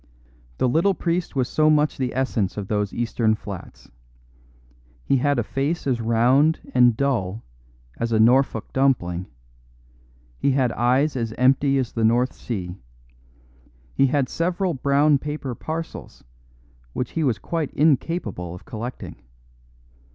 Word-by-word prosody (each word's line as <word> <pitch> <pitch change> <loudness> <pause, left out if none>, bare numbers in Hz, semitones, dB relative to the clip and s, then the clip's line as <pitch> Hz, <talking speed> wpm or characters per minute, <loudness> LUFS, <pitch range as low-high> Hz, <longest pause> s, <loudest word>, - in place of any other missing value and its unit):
The - - +2
little 170 +9 +2
priest 170 -2 -2
was 130 -3 +1
so 155 0 +2
much 150 -1 +2
the 125 -2 -2
essence 115 -8 -1
of 100 -2 -4
those 105 -2 -1
Eastern 115 -2 0
flats; 100 -4 -10 1.1
he 135 - +3
had 145 +2 +1
a 120 - +1
face 140 +9 -2
as 125 -4 0
round 125 +7 +3
and 120 -3 +5
dull 115 -7 -1 0.6
as 115 0 -1
a 110 - +2
Norfolk 120 0 +3
dumpling; 95 -10 +1 1.1
he 140 - +2
had 130 -3 +2
eyes 130 +6 +1
as 115 -3 -2
empty 135 +2 +3
as 130 -3 -1
the 115 - -2
North 120 +3 +2
Sea; 90 -7 -5 1.2
he 135 - +3
had 140 -1 +1
several 175 +2 -1
brown 140 +2 +3
paper 150 -3 -4
parcels, 160 +6 -7 0.7
which 125 - -3
he 165 - -1
was 125 -6 +1
quite 165 -4 -3
incapable 135 - 0
of 90 - -13
collecting. 120 -1 -7
130 Hz, 135 wpm, -23 LUFS, 115-145 Hz, 1.2 s, and